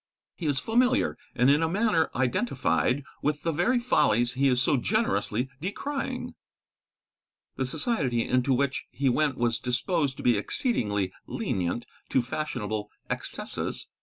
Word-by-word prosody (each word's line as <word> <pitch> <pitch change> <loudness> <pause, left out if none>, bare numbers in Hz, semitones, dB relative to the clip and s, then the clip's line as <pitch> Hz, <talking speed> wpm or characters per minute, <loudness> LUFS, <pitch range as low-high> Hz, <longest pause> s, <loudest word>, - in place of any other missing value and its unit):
He 165 - -4
is 145 -2 +1
familiar, 250 - +2 0.2
and 125 +1 +3
in 145 +3 +5
a 160 - +2
manner 185 -4 +2
identified, 125 - +1 0.2
with 150 0 -1
the 165 - +1
very 180 - +2
follies 120 - +3
he 135 +2 +2
is 125 -2 +3
so 145 - +3
generously 160 - 0
decrying. 275 - -3 1.2
The - - -1
society 135 - 0
into 125 +2 +2
which 140 +1 +1
he 140 -1 0
went 145 +1 +1
was 120 -1 +1
disposed 135 +3 0
to - - -7
be 120 -3 +4
exceedingly 105 - 0
lenient 90 +6 -2 0.2
to 130 - +2
fashionable 110 -6 -3 0.2
excesses. - - -4
135 Hz, 135 wpm, -27 LUFS, 120-175 Hz, 1.2 s, in